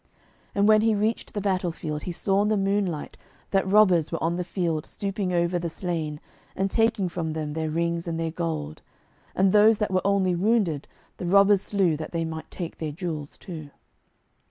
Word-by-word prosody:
And 200 +1 +3
when 215 0 +6
he 220 -1 +3
reached 215 +3 -1
the 205 - -1
battle 185 -3 0
field, 150 -2 -5
he 180 - -4
saw 195 +3 +1
in 210 - +2
the 215 0 +2
moonlight 195 -5 -1 0.3
that 195 -2 +1
robbers 185 -7 +5
were 165 - -3
on 170 +1 +1
the 180 - -2
field 170 -3 -1
stooping 195 -2 -3
over 175 0 +1
the 170 0 -3
slain, 160 -4 -3 0.4
and 195 0 -1
taking 225 -4 +2
from 165 -2 -3
them 155 -1 -3
their 160 0 -2
rings 170 +1 -1
and 165 -1 -2
their 165 -1 -1
gold. 160 - -4 0.5
And 190 0 +4
those 215 +2 +6
that 210 -1 -1
were 185 0 +2
only 195 -2 +2
wounded, 180 -5 +1 0.3
the 180 - -4
robbers 200 +1 +5
slew, 195 -7 +1
that 155 - -7
they 165 -1 -1
might 160 0 -6
take 170 -3 -6
their 155 -2 -3
jewels 155 -3 -5
too. 160 -5 -8
180 Hz, 195 wpm, -26 LUFS, 165-200 Hz, 0.5 s, when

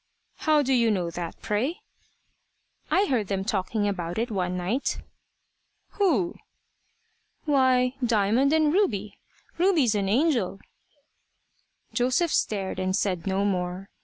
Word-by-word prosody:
"How 305 -2 +3
do 265 0 +1
you 235 -2 +3
know 180 -5 -1
that, 170 0 -6
pray?" 230 +10 -1 1.1
"I 390 +2 +3
heard 240 - 0
them 195 0 -2
talking 205 0 -1
about 175 -4 -3
it 230 +1 -1
one 180 -3 -1
night." 200 +10 -1 0.9
"Who?" 290 - +1 1.1
"Why 260 -3 +3
Diamond 230 +4 +2
and 310 -1 +3
Ruby. 210 - 0 0.4
Ruby's 335 - +3
an 200 -2 0
angel." 235 - +1 1.3
Joseph 255 +7 +1
stared 195 -3 -1
and 185 0 0
said 185 -4 -1
no 195 +1 +1
more. 185 0 -2
215 Hz, 120 wpm, -26 LUFS, 190-270 Hz, 1.3 s, How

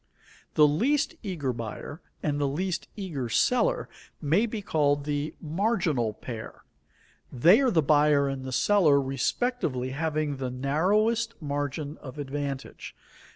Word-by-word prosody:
The 150 - +7
least 265 - +1
eager 160 - -2
buyer 115 - -7 0.2
and 145 -1 0
the 140 - +2
least 175 +5 -2
eager 155 - -4
seller - - +2 0.3
may 170 +10 +2
be 215 -2 -5
called 145 -5 +1
the 145 +1 -2
marginal 165 - 0
pair. 110 +1 -8 0.7
They 170 - +6
are 265 - +3
the 165 -8 +2
buyer 145 -1 +4
and 135 -1 -4
the 130 - -5
seller 155 -1 +4
respectively 135 - -1
having 155 0 -1
the 130 -1 -3
narrowest 205 - +1
margin 145 0 -3
of 135 +1 -10
advantage. 140 -1 -5
150 Hz, 130 wpm, -27 LUFS, 135-190 Hz, 0.7 s, The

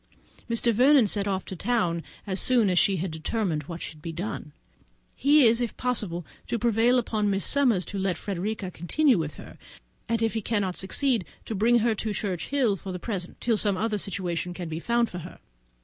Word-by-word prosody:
Mr. 230 0 +2
Vernon 260 +2 +6
set 200 0 +1
off 190 -1 -1
for 190 - -5
London 195 -8 +1 0.2
as 190 -2 0
soon 235 -6 +4
as 180 - +4
she 195 - +3
had 180 +1 -3
determined 160 +1 -2
what 170 +2 -7
should 155 -1 -8
be 165 - -5
done. 170 -2 -5 0.6
He 290 0 +5
is, 230 +1 +4
if 240 - -3
possible, 210 -9 -2 0.2
to 235 - -1
prevail 235 +2 +3
on 210 -2 +1
Miss 195 0 0
Summers 245 -10 +3
to 200 - -5
let 190 -2 0
Frederica 200 0 -3
continue 235 - +2
with 155 -2 -3
her; - - -12 0.5
and 230 0 +1
if 225 - +1
he 225 - -1
cannot 200 -4 -1
succeed, 235 +3 0 0.2
to - - -4
bring 225 +4 +4
her 235 - +3
to 215 0 -3
Churchhill 205 +4 0
for 190 +1 -7
the 180 - -4
present, 180 -2 -5
till 230 -2 +1
some 205 -2 +1
other 215 +1 0
situation 180 -2 -3
can 175 -2 -5
be 160 0 -4
found 235 +4 +1
for 180 - -7
her. 175 +2 -10
205 Hz, 200 wpm, -26 LUFS, 180-235 Hz, 0.6 s, Vernon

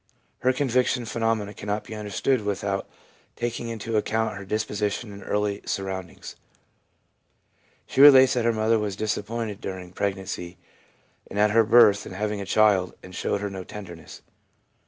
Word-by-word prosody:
Her 130 - +3
conviction 125 -2 +1
phenomena 115 -3 -1
cannot 105 +1 -3
be - - -9
understood 110 +4 -1
without 100 -1 -2 0.5
taking 120 0 -3
into 115 0 -3
account 110 +1 0
her 100 - -7
disposition 105 +1 -2
and 100 - -10
early 105 0 -1
surroundings. 95 -2 -5 1.5
She 135 - +1
relates 130 -2 +9
that 120 -3 0
her 115 - +4
mother 110 0 +2
was 105 -2 -3
disappointed 110 0 -3
during 90 -2 -7
preg 100 0 -1
nancy 90 -2 -7 0.7
and - - -7
at 105 0 +4
her 115 +1 +5
birth 105 -3 +5
in - - -8
having 105 +1 -2
a 100 - -6
child, 100 -4 +3
and 95 - -11
showed 100 - -2
her 100 - -2
no 95 -1 -6
tenderness. 90 -5 -10
105 Hz, 155 wpm, -25 LUFS, 100-115 Hz, 1.5 s, relates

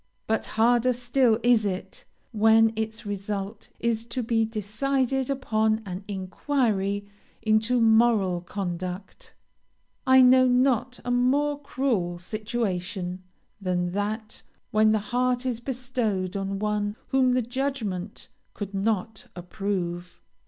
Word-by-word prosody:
But 220 0 -1
harder 240 +2 +4
still 245 -1 +2
is 240 -2 +4
it, 190 -2 -4 0.3
when 225 0 +4
its 220 +1 -4
result 205 +1 -5
is 230 -1 0
to 240 +1 -3
be 225 -1 +1
decided 255 +5 -1
upon 220 -5 0
an 185 +1 -6
inquiry 200 0 -1 0.4
into 220 +3 +2
moral 220 -5 +3
conduct. 180 0 -6 0.7
I 260 0 +7
know 255 +1 +6
not 250 0 +2
a 245 - -1
more 285 +4 +2
cruel 240 -11 -1
situation 190 -3 -3 0.4
than 180 -2 -1
that 210 +3 -3 0.3
when 215 0 +4
the 215 - +3 0.2
heart 250 0 +1
is 245 -3 -1
bestowed 240 -7 -2
on 195 0 -2
one 210 0 -1
whom 260 -1 +3
the 250 -1 +2
judgment 230 -7 -3 0.3
could 200 -1 -6
not 215 +1 -2
approve. 180 - -4
220 Hz, 115 wpm, -26 LUFS, 195-245 Hz, 0.7 s, I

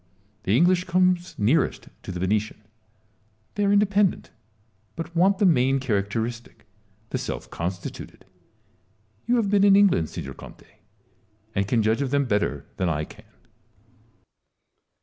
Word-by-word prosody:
The 100 +5 +3
English 180 +3 +3
comes 180 0 +1
nearest 120 +11 +1
to - - -7
the 90 - -5
Venetian: 105 +4 -1 1.0
they 205 - -1
are 200 - +2
independent, 205 -2 +2 0.6
but 165 +1 -7
want 190 +3 +3
the 200 - +2
main 135 -5 +3
characteristic, 115 0 -3 0.5
the - - -1
self - - -6
constituted. 90 +1 -6 1.0
You 245 - +3
have 215 -5 +1
been 200 -1 +4
in 200 -1 +6
England, 195 - +3
signor 70 - -7
Conte, - - -13 0.9
and 100 -1 -1
can 115 0 +1
judge 110 +5 +1
of 140 - -1
them 140 +1 +1
better 105 -4 -1
than 90 -2 0
I 75 -2 -1
can. - - -16
135 Hz, 135 wpm, -24 LUFS, -, 1.0 s, in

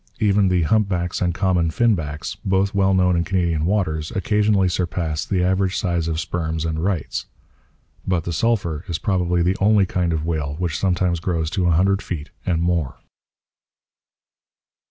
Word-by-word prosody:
Even 100 -2 +3
the 90 -2 +2
humpbacks 90 -2 0
and 90 -1 +2
common 90 -2 +1
finbacks, 80 -8 -1
both 95 +1 +1
well 95 -1 +2
known 90 -1 +3
in 85 - +1
Canadian 85 -3 0
waters, 80 -6 0
occasionally 105 -1 +2
surpass 85 -4 -2
the 95 -3 0
average 95 +1 +1
size 85 -5 -1
of 80 -1 -1
sperms 80 -2 -2
and 80 0 -2
'rights.' 90 -6 -2 0.8
But 90 -3 +1
the 85 - -3
sulphur 85 -7 0
is 85 -3 -2
probably 90 -4 0
the 90 +3 +1
only 105 0 +4
kind 90 -1 -1
of 80 -1 -2
whale 75 -4 -2
which 85 -3 -2
sometimes 90 -2 +1
grows 80 -2 -2
to 95 -4 0
a - - +3
hundred 100 +2 +2
feet 75 -5 -6 0.2
and 85 -2 +1
more. 85 -6 -1
90 Hz, 160 wpm, -21 LUFS, 80-95 Hz, 0.8 s, only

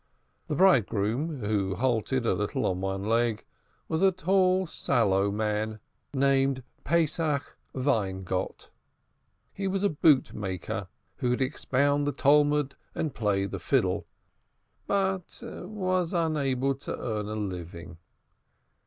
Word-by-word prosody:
The 150 - -1
bridegroom, 135 - +2
who 100 -3 0
halted 125 +2 0
a - - +3
little 105 -1 -1
on 90 0 0
one 95 0 -2
leg, 115 0 +1 0.4
was 160 +1 -1
a 195 0 +6
tall 185 0 +2
sallow 100 - +1
man 105 +1 -1 0.3
named 135 -1 +2 0.2
Pesach 160 -3 0 0.2
Weingott. 95 -8 -1 0.8
He 195 0 -3
was 190 +1 -1
a 205 - +4
boot 150 -4 +3
maker, 95 -4 -4 0.3
who 125 - 0
could 125 +2 0
expound 145 +1 +1
the - - +2
Talmud 145 0 +3 0.2
and 155 -3 -2
play 100 -3 +1
the 100 -1 -5
fiddle, 95 -3 +1 0.8
but 190 -2 0
was 185 -3 -2
unable 140 -6 +1
to 135 - -6
earn 105 -3 -3
a 110 - -4
living. 90 -4 -6
130 Hz, 120 wpm, -28 LUFS, 105-155 Hz, 0.8 s, a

